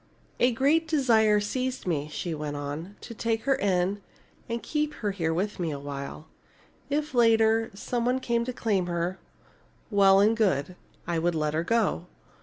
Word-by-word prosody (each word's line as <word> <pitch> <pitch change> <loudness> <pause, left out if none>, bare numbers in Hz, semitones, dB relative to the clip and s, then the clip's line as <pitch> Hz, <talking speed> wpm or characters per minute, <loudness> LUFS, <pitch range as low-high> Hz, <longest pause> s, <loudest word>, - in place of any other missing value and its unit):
"A 245 - +4
great 290 +7 +2
desire 225 -9 +4
seized 255 +5 -3
me," 155 -4 -1
she 170 +2 -3
went 150 -1 -4
on, 145 +7 -5
"to 230 - -8
take 225 0 -1
her 275 - +3
in 195 0 0 0.5
and 235 0 -3
keep 300 -1 -1
her 205 -3 -2 0.2
with 195 +5 -2
me 170 -2 -1
a 145 - -3
while. 140 +1 -7 0.6
If, 300 +1 -1
later, 225 -1 +4
some 240 +4 -2
one 250 +2 +1
came 235 -2 0
to 255 - -3
claim 205 -7 0
her, 175 +2 -2 0.7
well 195 -1 +6
and 215 +3 +4
good. 180 -7 0 0.3
I 170 -1 -1
would 170 +1 0
let 155 -1 0
her 160 +1 0
go. 210 -4 0
205 Hz, 170 wpm, -27 LUFS, 170-235 Hz, 0.7 s, well